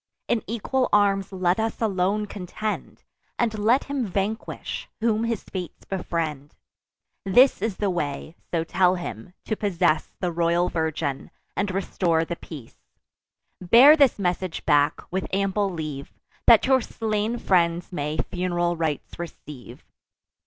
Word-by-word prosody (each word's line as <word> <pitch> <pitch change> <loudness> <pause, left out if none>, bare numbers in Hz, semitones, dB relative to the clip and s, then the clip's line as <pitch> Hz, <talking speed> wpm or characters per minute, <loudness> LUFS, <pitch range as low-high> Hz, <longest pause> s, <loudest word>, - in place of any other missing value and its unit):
In 230 - +1
equal 235 +4 -1
arms 200 -2 +3
let 185 0 +1
us 220 0 -2
alone 205 -1 0
contend; 210 +2 -5 0.3
And 225 -3 0
let 230 +6 +3
him 280 -2 -2
vanquish, 200 +4 -3
whom 225 0 +1
his 230 -3 -2
fates 180 -4 -7
befriend. 160 -6 -3 0.7
This 245 +4 +5
is 215 -2 -2
the 205 -2 0
way 155 -1 -4
(so 165 -2 0
tell 180 +2 +2
him) 175 - -7
to 220 - -1
possess 175 -6 +1
The 180 -2 -1
royal 170 +1 +1
virgin, 160 -4 -2 0.3
and 200 0 0
restore 180 -3 0
the 170 - -4
peace. 145 -8 -11 0.8
Bear 240 - +8
this 280 -5 +4
message 180 -2 -2
back, 145 -2 +3
with 190 +1 -2
ample 195 +1 0
leave, 155 -6 -6 0.4
That 230 -2 +7
your 260 0 +4
slain 220 +1 -2
friends 170 -5 +1
may 150 -2 -3
fun'ral 175 -1 -1
rites 160 -1 -3
receive." 150 -6 -9
185 Hz, 135 wpm, -24 LUFS, 170-215 Hz, 0.8 s, Bear